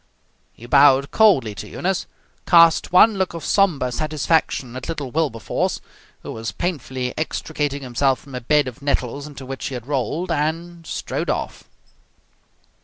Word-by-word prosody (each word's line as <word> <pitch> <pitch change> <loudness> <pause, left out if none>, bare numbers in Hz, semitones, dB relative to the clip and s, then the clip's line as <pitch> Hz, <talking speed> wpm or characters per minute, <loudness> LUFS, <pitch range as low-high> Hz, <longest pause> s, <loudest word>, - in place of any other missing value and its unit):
He 115 - -14
bowed 140 +1 +5
coldly 170 - +4
to - - -8
Eunice, 190 0 -2 0.4
cast 170 -2 +5
one 200 +3 +6
look 185 -2 -1
of 165 - -6
sombre 160 -11 +2
satisfaction 155 -3 0
at 130 +5 -7
little 145 -6 -4
Wilberforce, 135 -9 -1 0.4
who - - -6
was 110 -2 -5
painfully 130 - -3
extricating 150 -3 -3
himself 130 +1 +1
from 140 - -15
a 125 - -4
bed 145 +3 +2
of 130 +2 -8
nettles 140 0 -2
into 140 -3 -10
which 135 +1 -5
he 135 - -5
had 120 -2 -7
rolled, 145 +6 -2
and 165 +2 -2
strode - - -3
off. - - -3
145 Hz, 150 wpm, -21 LUFS, 130-165 Hz, 0.4 s, one